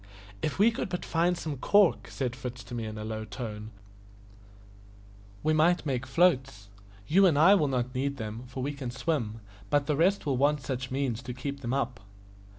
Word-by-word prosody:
"If 150 - -2
we 215 +4 +5
could 225 - -4
but 180 0 -4
find 175 +1 +1
some 155 -4 -4
cork," 200 +6 +3
said 125 -3 -3
Fritz 125 -2 -7
to 100 - -10
me 115 -2 -3
in 110 0 -6
a 105 - -5
low 110 0 -4
tone, 105 0 -6 1.7
"we 155 - +2
might 165 +3 +3
make 130 -2 -2
floats. 130 - +2 0.4
You 190 - +5
and 160 -5 +3
I 170 +7 +7
will 165 -8 +3
not 125 -2 -1
need 140 +2 -1
them, 110 +1 -6
for 125 +1 -5
we 145 +2 -2
can 140 -3 -5
swim, 120 -5 -2 0.3
but 145 -1 +2
the 150 - +1
rest 185 +6 +2
will 135 -3 0
want 145 +2 +2
some 130 -1 -3
such 130 -1 -6
means 130 -3 -1
to 125 -2 -7
keep 140 +2 -5
them 125 0 -1
up." 125 -4 -2
135 Hz, 200 wpm, -29 LUFS, 120-155 Hz, 1.7 s, I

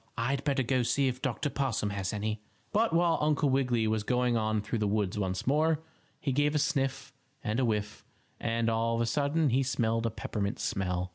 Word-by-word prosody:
"I'd 135 +4 0
better 140 -2 +1
go 130 +1 +1
see 135 +3 +2
if 130 0 -2
Dr. 135 +2 -1
Possum 120 -7 -1
has 100 -2 -2
any." 105 0 -2 0.3
But 225 +2 +2
while 170 0 +3
Uncle 150 -2 +2
Wiggily 125 -4 +2
was 110 0 +1
going 125 +2 +1
on 110 -1 +1
through 110 +2 -2
the 105 - +1
woods 105 -1 0
once 95 -2 -2
more, 155 +3 +2 0.4
he 140 - -1
gave 145 +3 +2
a - - +4
sniff 135 -3 -1 0.3
and 110 +3 -1
a 130 - +3
whiff, 105 -2 -2 0.4
and, 115 0 0
all 115 +1 +1
of 115 - 0
a - - +2
sudden, 145 +5 +1
he 130 +3 +3
smelled 115 -3 0
a - - 0
peppermint 105 0 -3
smell. 90 -4 -1
120 Hz, 205 wpm, -30 LUFS, 110-140 Hz, 0.4 s, a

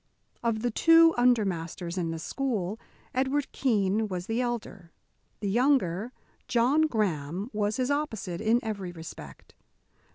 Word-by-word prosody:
Of 230 -1 -1
the 245 - +1
two 330 +6 +6
under 240 -3 +4
masters 170 -1 -4
in 175 -3 -1
the 165 - -3
school, 215 +1 -2 0.3
Edward 270 +2 0
Keene 215 -4 +1
was 180 -3 -4
the 225 +4 -1
elder. 210 -8 -4 0.5
The 205 - -2
younger, 235 -4 +2 0.4
John 265 +6 +3
Graham, 190 - -2
was 210 0 0
his 255 +1 0
opposite 220 - -2
in 225 +2 +3
every 200 -5 -4
respect. 165 -2 -11
220 Hz, 135 wpm, -28 LUFS, 185-250 Hz, 0.5 s, two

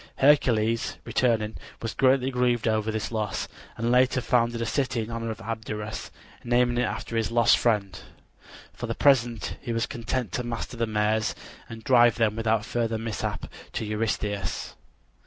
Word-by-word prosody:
Hercules, 115 -6 +3
returning, 110 -3 +1 0.2
was 115 -1 -4
greatly 130 0 +3
grieved 125 -2 +1
over 110 0 +1
this 110 0 -2
loss, 105 -3 -2 0.3
and 115 +2 0
later 130 +1 +4
founded 120 -2 +1
a 115 - -1
city 125 0 0
in 110 - -7
honor 115 0 -3
of 110 -1 -6
Abderus, 110 -1 -5 0.3
naming 120 0 +2
it 125 - +2
after 115 - -5
his 115 -2 +1
lost 115 0 +5
friend. 105 -5 0 0.7
For - - -6
the - - -2
present 120 -5 +2
he 120 - -4
was 115 +1 +1
content 115 -2 -3
to 125 - -2
master 120 +1 -4
the 115 -1 -1
mares 110 0 +1 0.3
and 115 -1 -9
drive 120 -3 +5
them 110 -2 +1
without 110 -1 +1
further 115 -2 -1
mishap 110 -2 -3 0.3
to - - -2
Eurystheus. 105 -1 -2
115 Hz, 160 wpm, -26 LUFS, 110-120 Hz, 0.7 s, lost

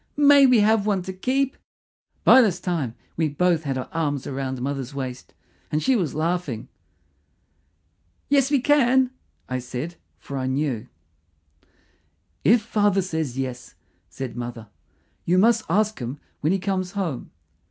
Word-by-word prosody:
"May 285 -1 +7
we 250 -4 +5
have 215 0 +3
one 195 -3 +1
to 190 - -6
keep?" 265 +7 0 0.7
By 260 - +8
this 190 -7 +1
time 160 -11 -2 0.2
we 160 -1 +1
both 165 +1 +1
had 135 -2 -1
our 130 - -4
arms 145 -4 -1
round 130 -1 -3
mother's 135 0 -4
waist, 130 -2 -6 0.4
and 150 +1 0
she 265 - +3
was 175 - -1
laughing. 160 -7 -2 1.6
"Yes, 275 -1 +3
we 285 -3 +2
can," 260 -2 +4 0.4
I 130 0 -2
said, 130 +7 -6 0.2
for 140 -1 -6
I 130 - -2
knew. 130 -4 -1 1.6
"If 225 +1 +5
father 205 -3 +2
says 160 -8 -3
yes," 130 -2 -5 0.3
said 130 -3 -6
mother. 120 -3 -6 0.5
"You 180 +2 +2
must 225 +3 +4
ask 215 +4 +1
him 125 +3 -5 0.2
when 155 - +1
he 195 - +2
comes 185 -1 -2
home." 180 -10 -3
170 Hz, 145 wpm, -24 LUFS, 135-215 Hz, 1.6 s, By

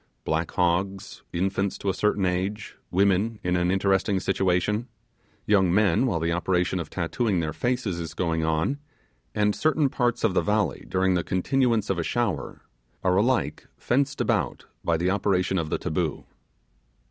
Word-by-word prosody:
Black 80 +1 -1
hogs 90 +2 -1
infants 95 +2 -1
to - - -6
a 95 - +2
certain 105 0 +1
age 95 +4 -2
women 100 +4 +2
in 90 0 +1
an 90 0 +1
interesting 95 +1 +2
situation 95 +5 0 0.6
young 95 -4 +3
men 105 +5 +3
while 85 -9 0
the 85 +1 0
operation 90 +1 0
of 85 - -5
tattooing 95 +3 -1
their 80 -2 -2
faces 120 -7 -1
is 85 -1 -6
going 80 -3 0
on 80 - 0 0.6
and 105 0 +2
certain 155 -2 +2
parts 120 -2 0
of 110 -5 +3
the - - +3
valley 105 -8 0
during 95 0 +2
the 90 -1 +1
continuance 115 +2 +1
of 90 - -1
a - - 0
shower 120 +6 -2 0.4
are 90 0 +3
alike 120 +5 +1
fenced 135 +3 0
about - - 0 0.2
by 85 -1 +1
the 90 +3 +1
operation 95 -2 +1
of 80 -2 -3
the - - 0
taboo. 80 0 -2
95 Hz, 160 wpm, -26 LUFS, 90-105 Hz, 0.6 s, young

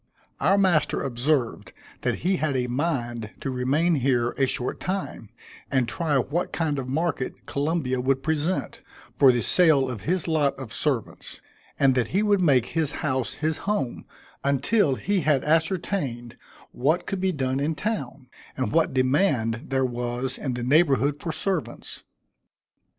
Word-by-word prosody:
Our 190 +7 +3
master 180 -6 +2
observed 130 0 -1 0.3
that - - 0
he 190 0 +2
had 150 -5 0
a 125 - 0
mind 120 -5 -2
to 135 - -2
remain 140 +7 +1
here 125 -4 +1
a 135 - 0
short 125 0 -2
time, 185 - -4 0.4
and 130 -3 +1
try 150 +2 0
what 145 +7 -1
kind 150 -4 -1
of 130 -1 -5
market 155 -2 -2
Columbia 140 -3 -1
would 135 +1 0
present, 160 +3 -1 0.3
for 135 -2 +6
the 120 -2 0
sale 155 - +4
of 120 -5 -5
his 180 +2 -1
lot 150 -4 +2
of 125 -6 -7
servants; 125 0 -3 0.4
and 135 -2 +4
that 125 -3 +1
he 195 - +1
would 205 -2 +3
make 130 -8 +3
his 160 -3 -1
house 130 -4 -1
his 155 +1 -1
home, 140 -13 -2 0.4
until 140 - +2
he 200 +6 0
had 145 -3 +2
ascertained 160 - -1 0.4
what 155 +8 0
could 195 -2 -3
be 190 0 +2
done 135 -4 -1
in 155 +3 -1
town, 140 - -4 0.3
and 130 - -1
what 160 -3 +2
demand 130 - +1
there 135 -1 +1
was 125 +1 -3
in 130 -4 -3
the 120 - -4
neighborhood 145 0 +3
for 165 - -2
servants. 185 -1 -4
140 Hz, 155 wpm, -25 LUFS, 130-165 Hz, 0.4 s, for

